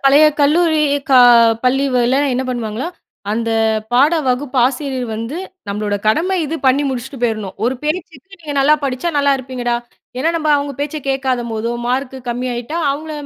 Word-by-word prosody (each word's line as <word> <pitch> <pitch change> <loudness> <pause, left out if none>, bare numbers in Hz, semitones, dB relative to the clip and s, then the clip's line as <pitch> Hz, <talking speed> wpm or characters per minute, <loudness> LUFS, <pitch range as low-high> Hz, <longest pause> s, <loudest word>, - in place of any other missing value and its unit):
பழைய 285 +3 +6 0.2
கல்லூரி 315 +2 +3 0.3
கா 260 -2 +6 0.5
பள்ளிகள்ல 255 -1 +2 0.2
என்ன 255 +1 0
பண்ணுவாங்களா, 240 +2 -3 0.5
அந்த 230 +1 -1 0.4
பாட 280 +6 +4 0.2
வகுப்பு 255 +1 -1
ஆசிரியர் 260 -1 -2
வந்து 230 +8 -5 0.3
நம்பளோட 205 0 -2
கடமை 350 +12 +2
இது 315 +2 -3
பண்ணி 265 +2 +4
முடிச்சுட்டு 260 +1 -5
போயிரணும். 215 -5 -1
ஒரு 250 +3 +1
பேச்சுக்கு 335 +3 -5
"நீங்க 305 -3 -6
நல்லா 295 +3 +5
படிச்சா, 260 +4 -2
நல்லா 280 0 +3
இருப்பீங்கடா" 250 -2 -3 0.4
ஏன்னா 325 +6 +1
நம்ம 310 -2 -2
அவுங்க 285 0 -3
பேச்ச 295 +1 -3
கேட்காதம்போதோ, 240 -4 -1 0.2
மார்க்கு 265 +1 -2
கம்மி 245 +1 -2
ஆயிட்டா, 240 +7 -5
அவுங்கள 310 +3 -4
265 Hz, 150 wpm, -17 LUFS, 245-295 Hz, 0.5 s, பழைய